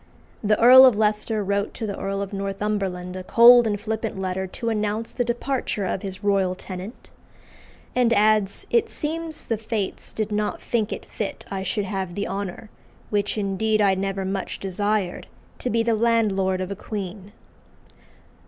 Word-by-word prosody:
The 210 0 +2
Earl 255 +3 +10
of 240 -5 +3
Leicester 215 0 +1
wrote 200 +1 -1
to 225 - -4
the 200 -2 -3
Earl 195 0 -3
of 200 +1 -8
Northumberland 195 -2 -3
a 185 - -5
cold 240 +3 +7
and 205 -1 -1
flippant 220 -1 -3
letter 190 0 -2
to 230 +5 -4
announce 215 +1 -2
the 245 - -1
departure 240 -3 -2
of 185 - -2
"his 190 0 -7
royal 195 -2 +2
tenant;" 185 +4 -9 0.8
and 245 -2 +3
adds, 215 -2 +2
"It 470 - +3
seems 320 +1 -4
the 225 -2 -2
Fates 220 -3 -4
did 215 -1 -3
not 210 0 -1
think 225 -3 -1
it - - -5
fit 210 - -5
I 195 -1 -2
should 195 +2 -2
have 190 -3 -4
the 205 - -2
honour, 200 +2 -5 0.4
which 205 +1 0
indeed 215 +2 0
I 200 -2 +4
never 195 0 -2
much 195 0 -3
desired, 200 0 -2 0.3
to 250 - -2
be 230 0 +1
the 230 0 +2
landlord 210 -5 +1
of 185 +1 -4
a - - -3
queen." 200 -1 -6
205 Hz, 170 wpm, -24 LUFS, 195-225 Hz, 0.8 s, Earl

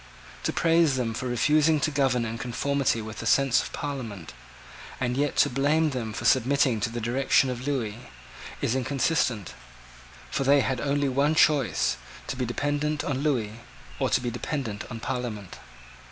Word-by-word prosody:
To - - +1
praise 165 -3 +3
them 120 -3 -1
for 130 +3 -4
refusing 150 +6 +3
to 155 - +1
govern 135 -4 +1
in 115 +1 -5
conformity 125 -1 0
with 110 0 -8
the 115 - -4
sense 135 -1 +4
of - - -7
Parliament, 110 - -6 0.7
and 125 -1 -1
yet 145 +1 0
to - - +5
blame 150 +4 +2
them 120 -4 -3
for 105 - -6
submitting 130 -2 +3
to 105 - -1
the 120 +1 -5
dictation 130 +3 +2
of 125 +2 -6
Lewis, 125 -7 -1 0.7
is - - +1
inconsistent. 130 - 0 0.8
For - - 0
they 140 +1 +5
had 130 -1 -1
only 145 0 +1
one 140 +4 +2
choice, 150 -5 +3 0.3
to - - -4
be 125 -1 -2
dependent 145 +4 -1
on 135 -2 -2
Lewis, 130 -8 0 0.5
or - - +1
to - - +3
be 120 -1 -3
dependent 120 -3 -4
on 115 - -6
Parliament. 115 -7 -5
130 Hz, 170 wpm, -26 LUFS, 115-145 Hz, 0.8 s, to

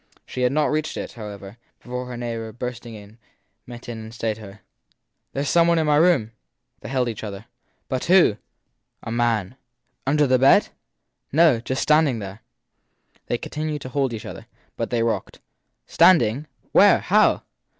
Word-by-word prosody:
She 130 - -6
had 125 0 +2
not 150 +2 +1
reached 155 +1 -2
it, - - -5
how 110 -3 -8
ever, 100 +1 -10 0.2
before 125 0 -6
her 125 -1 -7
neighbour, 115 -2 -5
bursting 120 0 -7
in, 105 +2 -14 0.5
met 120 -1 -10
her 120 - -6
and 110 -1 -9
stayed 110 -1 -3
her. 100 -1 -12 0.7
There 140 - -2
s 140 - -2
some 170 -1 +4
one 170 0 +3
in 160 - +1
my 150 -1 +3
room! 155 -9 +3 0.5
They - - -9
held 130 -2 0
each 110 -2 -5
other. 100 0 -7 0.4
But 130 -2 -3
who? 175 - +5 0.7
A - - -6
man/ 115 -1 0 0.5
Under 150 +2 +3
the 130 -1 +3
bed? 135 +2 +5 0.6
No 155 -5 +4
just 130 +3 -2
standing 150 -5 +3
there. 100 0 -8 0.9
They 120 - 0
continued 150 +2 -4
to 130 - -7
hold 135 -1 0
each 110 -3 -6
other, - - -9 0.3
but - - -3
they 120 -2 0
rocked. 115 - -3 0.5
Stand 185 -9 +5
ing? 120 +8 -3 0.2
Where? - - +6
How? - - +3
125 Hz, 175 wpm, -23 LUFS, 110-145 Hz, 0.9 s, Where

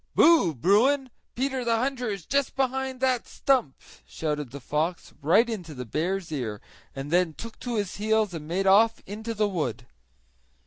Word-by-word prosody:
"Boo! 315 - +5
Bruin! 245 - +3 0.2
Peter 265 0 -1
the 230 -1 +2
hunter 250 -1 -1
is 195 -6 -5
just 280 +1 0
behind 265 0 -1
that 255 -2 +1
stump!" 260 - +1 0.3
shouted 150 -4 -3
the 140 +4 -8
fox 155 +6 -2
right 190 - +4
into 180 -10 -5
the 125 -1 -6
bear's 170 - -2
ear, 115 -8 -3 0.4
and 135 +2 -6
then 175 -2 +2
took 230 -1 -9
to 245 -2 -3
his 205 -4 -2
heels 215 -1 +1
and 155 -2 -6
made 185 +4 -1
off 210 +4 +4
into 220 +3 -5
the 210 0 +2
wood. 130 - -3
205 Hz, 170 wpm, -26 LUFS, 155-245 Hz, 0.4 s, Boo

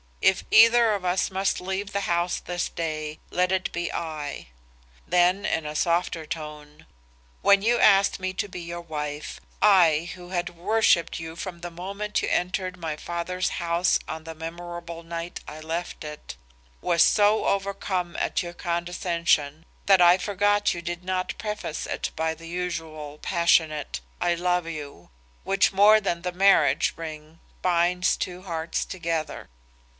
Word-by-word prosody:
'If 190 - +3
either 230 0 +7
of 200 -3 -3
us 180 0 +1
must 190 0 0
leave 190 +2 -4
the 200 - 0
house 175 -1 0
this 175 0 -3
day, 155 -2 -4
let 180 +1 +1
it 190 -1 0
be 175 -1 -3
I.' 155 - -5 0.6
Then 180 +3 +3
in 160 - -1
a 150 0 -5
softer 170 0 0
tone, 150 0 -8 0.5
'When 200 -1 +5
you 235 +2 +3
asked 195 -1 +5
me 185 0 -3
to 190 +2 -2
be 180 -2 -8
your 170 0 -6
wife, 150 -2 -5 0.2
I 170 -5 +5
who 180 -1 -12
had 180 -1 -3
worshipped 180 -3 +2
you 160 0 -7
from 170 0 -7
the 175 - -5
moment 200 +5 -3
you - - -1
entered 185 +1 -1
my 160 -3 -4
father's 175 +3 -2
house 170 +1 +2
on 160 0 -5
the 160 0 -8
memorable 170 +1 -7
night 170 +1 -5
I 155 - -8
left 165 +3 -4
it, 150 0 -8 0.5
was 170 -2 +4
so 210 +1 +4
overcome 195 -3 -1
at - - 0
your 175 0 -7
condescension 170 -3 -1 0.2
that 195 -2 +6
I 175 +1 +7
forgot 205 +2 +1
you 170 - -6
did 175 0 -5
not 185 0 -2
preface 210 -7 -4
it - - -3
by 160 0 0
the 165 +1 -12
usual 160 -4 -5
passionate, 160 - +1 0.2
'I 175 - +1
love 180 0 0
you,' 145 - -8 0.3
which 195 0 +2
more 210 +3 +7
than 170 -3 -2
the 180 - -1
marriage 195 +2 +4
ring 155 0 -8 0.2
binds 180 +1 +2
two 180 0 -5
hearts 165 -3 -2
together. 165 -4 -4
175 Hz, 155 wpm, -25 LUFS, 165-185 Hz, 0.6 s, either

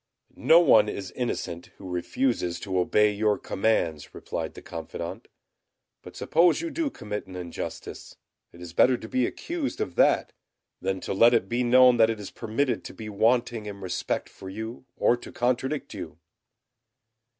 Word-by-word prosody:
"No 165 - +6
one 110 -10 +5
is 95 -3 -5
innocent 90 -8 -4
who 95 - -10
refuses 90 +1 -1
to 95 -2 -1
obey 105 +4 +3
your 105 0 +1
commands," 85 -8 -1
replied - - -5
the - - -9
confidant. - - -7 0.7
"But - - -12
suppose 170 +2 +3
you 335 -1 -4
do 325 -2 -1
commit 105 - -6
an 95 - -10
injustice, 90 -2 -7 0.4
it 85 - -15
is 85 -1 -9
better 125 +7 +4
to 110 - -9
be 125 +1 +1
accused 330 -4 -4
of 90 - -2
that - - +3 0.5
than 95 -1 -2
to - - -3
let 115 +5 +6
it 115 - +1
be 120 +1 0
known 125 0 +6
that 110 -1 +5
it 115 -1 -2
is 100 - -7
permitted 120 +2 -1
to - - -8
be 110 -1 -7
wanting 115 +1 +1
in 100 -1 -7
respect 95 -2 -2
for 95 - -11
you 110 +5 -7
or 120 - +3
to - - -11
contradict 130 +4 -1
you." - - -7
110 Hz, 170 wpm, -26 LUFS, 95-125 Hz, 0.7 s, No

